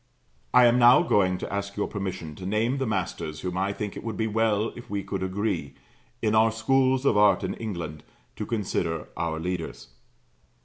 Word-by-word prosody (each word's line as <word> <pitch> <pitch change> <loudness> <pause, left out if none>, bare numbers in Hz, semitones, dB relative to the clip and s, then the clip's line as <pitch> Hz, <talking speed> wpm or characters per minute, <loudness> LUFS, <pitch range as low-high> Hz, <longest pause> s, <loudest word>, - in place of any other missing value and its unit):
I 125 0 +7
am 120 +1 +5
now 120 +1 +7
going 95 -2 +2
to 90 - -6
ask 100 0 -3
your 105 - +1
permission 95 -6 -5
to 90 - -8
name 115 +6 0
the 135 - -1
masters 85 -6 -3
whom 90 -1 -3
I 95 +2 0
think 105 0 -5
it - - -7
would 115 -2 -4
be 110 - 0
well 110 0 +1
if 120 - -11
we 100 -1 -2
could 100 -1 -4
agree, 95 -7 -2 0.5
in 110 -1 +2
our 110 +1 +5
Schools 130 +4 +2
of 110 - +4
Art 105 -2 +5
in - - -2
England, 85 -9 -6 0.3
to 105 - -4
consider 90 -7 -2
our 80 -1 -2
leaders. 80 -8 -4
100 Hz, 190 wpm, -26 LUFS, 90-110 Hz, 0.5 s, I